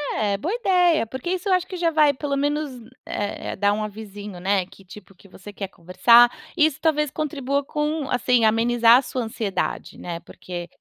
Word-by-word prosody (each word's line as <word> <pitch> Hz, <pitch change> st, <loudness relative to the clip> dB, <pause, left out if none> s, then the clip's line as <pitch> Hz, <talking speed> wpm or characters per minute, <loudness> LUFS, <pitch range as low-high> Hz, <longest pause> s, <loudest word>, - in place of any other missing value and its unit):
É, 205 Hz, -2 st, 0 dB
boa 340 Hz, -, -3 dB
ideia, 360 Hz, -, +3 dB
porque 260 Hz, +8 st, -6 dB
isso 370 Hz, +1 st, -3 dB
eu -, -, +4 dB
acho 365 Hz, 0 st, +1 dB
que 370 Hz, -, -6 dB
já 340 Hz, -1 st, +1 dB
vai 305 Hz, -2 st, +4 dB
pelo 280 Hz, +1 st, -3 dB
menos, 290 Hz, +1 st, -1 dB, 0.3 s
eh 205 Hz, 0 st, -4 dB
eh, -, -, -5 dB
dar 205 Hz, +1 st, +2 dB
um 215 Hz, -, -2 dB
avizinho, 205 Hz, -2 st, -8 dB
né? 190 Hz, 0 st, +1 dB
Que 195 Hz, -, -18 dB
tipo, 190 Hz, +1 st, -14 dB
que 195 Hz, -, -20 dB
você 195 Hz, +2 st, -12 dB
quer 195 Hz, -1 st, -5 dB
conversar. 235 Hz, +8 st, +5 dB, 0.3 s
Isso 310 Hz, -2 st, +3 dB
talvez 300 Hz, -3 st, +1 dB
contribua 280 Hz, -2 st, -2 dB
com 300 Hz, 0 st, -2 dB
assim, 250 Hz, -1 st, +2 dB
amenizar 230 Hz, +1 st, +5 dB
a -, -, +2 dB
sua 255 Hz, -, -4 dB
ansiedade, 220 Hz, -3 st, -3 dB
né. 170 Hz, -1 st, -5 dB
Porque 175 Hz, 0 st, -8 dB
240 Hz, 195 wpm, -23 LUFS, 205-300 Hz, 0.3 s, conversar